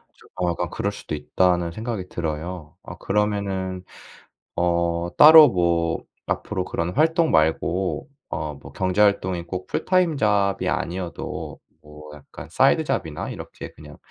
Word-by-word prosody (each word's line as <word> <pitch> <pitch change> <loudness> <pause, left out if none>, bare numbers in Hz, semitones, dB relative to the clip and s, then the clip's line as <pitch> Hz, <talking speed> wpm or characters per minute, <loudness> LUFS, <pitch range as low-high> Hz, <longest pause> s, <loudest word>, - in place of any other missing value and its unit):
좀 - - -21
어 90 - +2
약간 85 0 -3
그럴 100 +3 -2
수도 80 - -6
있다는 85 +1 +1
생각이 110 -2 -5
들어요. 80 0 -5
어 85 - -9
그러면은 95 -3 -2 0.7
어 85 0 0
따로 155 0 +10
뭐 85 -2 0 0.2
앞으로 95 -3 -2
그런 85 +1 -3
활동 160 +3 +2
말고 80 +4 +1 0.2
어 75 -1 -4
뭐 70 - -13
경제 95 +2 0
활동이 95 -4 +2
꼭 90 +2 -6
풀타임 180 -5 +1
잡이 100 -3 +1
아니어도 90 0 -4 0.2
뭐 75 0 -13
약간 75 - -12
사이드 - - +3
잡이나 - - -3
이렇게 - - -9
그냥 - - -14
90 Hz, 280 characters per minute, -23 LUFS, 85-100 Hz, 0.7 s, 따로